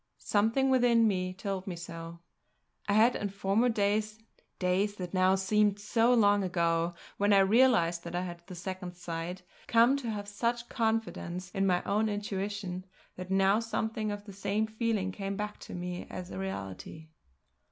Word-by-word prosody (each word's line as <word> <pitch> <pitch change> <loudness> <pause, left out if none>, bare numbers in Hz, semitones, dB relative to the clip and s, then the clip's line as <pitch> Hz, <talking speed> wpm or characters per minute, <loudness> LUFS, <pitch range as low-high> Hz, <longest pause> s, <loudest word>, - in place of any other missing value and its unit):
Something 225 +6 +2
within 240 -3 +4
me 185 -3 0
told 195 0 -4
me 180 - -3
so. 165 0 -8 0.7
I - - +3
had 225 +4 +5
in 205 - -2
former 200 +5 +1
days 215 0 0 0.4
days 190 +3 +1
that 180 -2 -6
now 185 0 +4
seemed 205 +1 +2
so 225 +3 +2
long 205 -4 +4
ago 170 -1 0 0.2
when 205 +1 +2
I 200 - +7
realised 195 -5 +4
that 170 0 -5
I 175 - 0
had 175 -1 -6
the 185 - -8
Second 180 0 -6
Sight, 175 +1 -5 0.2
come 235 +3 +5
to 250 -4 -4
have 205 -2 -4
such 235 +3 -2
confidence 220 -6 -2
in 195 -1 +1
my 180 -1 +2
own 215 +2 +1
intuition 200 -2 -3 0.3
that 185 0 -7
now 195 +2 +4
something 220 -1 -2
of 205 0 -6
the 200 - -10
same 200 +2 0
feeling 220 -3 -1
came 195 +1 -4
back 210 0 -4
to - - -9
me 180 0 -5
as 185 -1 -7
a - - -5
reality. 160 - -6
200 Hz, 170 wpm, -30 LUFS, 180-215 Hz, 0.7 s, I